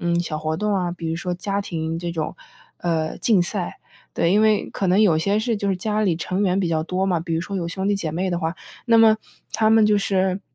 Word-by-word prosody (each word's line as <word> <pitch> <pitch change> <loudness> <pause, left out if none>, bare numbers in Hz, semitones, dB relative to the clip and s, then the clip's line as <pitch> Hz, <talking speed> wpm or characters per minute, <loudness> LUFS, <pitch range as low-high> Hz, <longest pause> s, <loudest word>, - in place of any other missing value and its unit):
嗯， 170 0 +1
小 170 -3 -2
活 155 0 -2
动 210 +2 0
啊， 180 -2 0
比 170 -1 -5
如 160 - -1
说 180 +1 -3
家 200 +3 -2
庭 165 -4 -3
这 175 -1 -3
种 160 -2 -3 0.4
呃， 160 -2 -1
竞 210 -6 +3
赛， 180 0 -3 0.4
对， 170 +2 +2
因 210 - +4
为 215 -1 +3
可 195 - -2
能 185 +3 +4
有 175 -7 +4
些 200 +5 +1
事 225 0 0
就 200 -1 -2
是 190 - +1
家 210 +3 -1
里 180 -5 +1
成 185 +4 -2
员 185 -1 +2
比 190 - +1
较 160 -1 0
多 185 +3 -1
嘛， 175 -4 +1
比 165 -1 -3
如 165 - 0
说 200 - -6
有 170 -2 -2
兄 190 +3 -3
弟 205 - +2
姐 170 -6 -3
妹 185 +4 -2
的 175 - -1
话， 165 +1 -2 0.3
那 230 -1 +5
么 220 -1 +6 0.4
他 215 -1 +2
们 220 -1 +6
就 210 -1 +4
是 190 -1 0
185 Hz, 280 characters per minute, -22 LUFS, 170-205 Hz, 0.4 s, 么